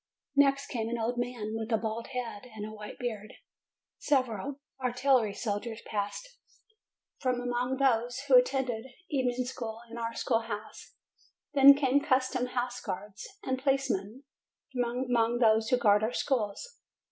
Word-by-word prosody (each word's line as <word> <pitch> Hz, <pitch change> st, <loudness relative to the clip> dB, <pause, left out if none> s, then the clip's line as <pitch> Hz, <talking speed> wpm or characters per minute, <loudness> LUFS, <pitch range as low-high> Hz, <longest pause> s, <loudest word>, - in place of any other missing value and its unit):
Next 275 Hz, 0 st, +4 dB
came 225 Hz, -2 st, -3 dB
an 235 Hz, -, -2 dB
old 235 Hz, +2 st, -1 dB
man 240 Hz, -3 st, -3 dB
with 225 Hz, +1 st, -4 dB
a 225 Hz, -, +4 dB
bald 225 Hz, +1 st, -3 dB
head 250 Hz, -2 st, -5 dB
and 210 Hz, -1 st, -5 dB
a 215 Hz, -, -7 dB
white 210 Hz, -1 st, -9 dB
beard. 215 Hz, -4 st, -5 dB, 0.6 s
Several 265 Hz, -1 st, 0 dB, 0.2 s
artillery 250 Hz, -4 st, +2 dB
soldiers 225 Hz, +1 st, -3 dB
passed, 215 Hz, -, -4 dB, 0.8 s
from 255 Hz, -2 st, 0 dB
among 245 Hz, +1 st, -1 dB
those 245 Hz, -1 st, +1 dB
who 280 Hz, -1 st, -1 dB
attended 250 Hz, -2 st, +3 dB, 0.2 s
evening 255 Hz, -3 st, 0 dB
school 230 Hz, -3 st, -5 dB
in 235 Hz, -, -6 dB
our 230 Hz, 0 st, -3 dB
schoolhouse; 220 Hz, -2 st, -3 dB, 0.6 s
then 280 Hz, 0 st, +9 dB
came 280 Hz, -1 st, +3 dB
custom 255 Hz, -2 st, +1 dB
house 245 Hz, 0 st, -3 dB
guards 205 Hz, +3 st, -6 dB, 0.2 s
and 260 Hz, -6 st, -2 dB
policemen, 265 Hz, -4 st, 0 dB, 0.5 s
from 245 Hz, 0 st, -1 dB
among 235 Hz, -1 st, +2 dB
those 220 Hz, -2 st, +4 dB
who 250 Hz, -, +4 dB
guard 210 Hz, -4 st, +4 dB
our 220 Hz, +3 st, 0 dB
schools. 265 Hz, -, -2 dB
245 Hz, 145 wpm, -30 LUFS, 220-260 Hz, 0.8 s, then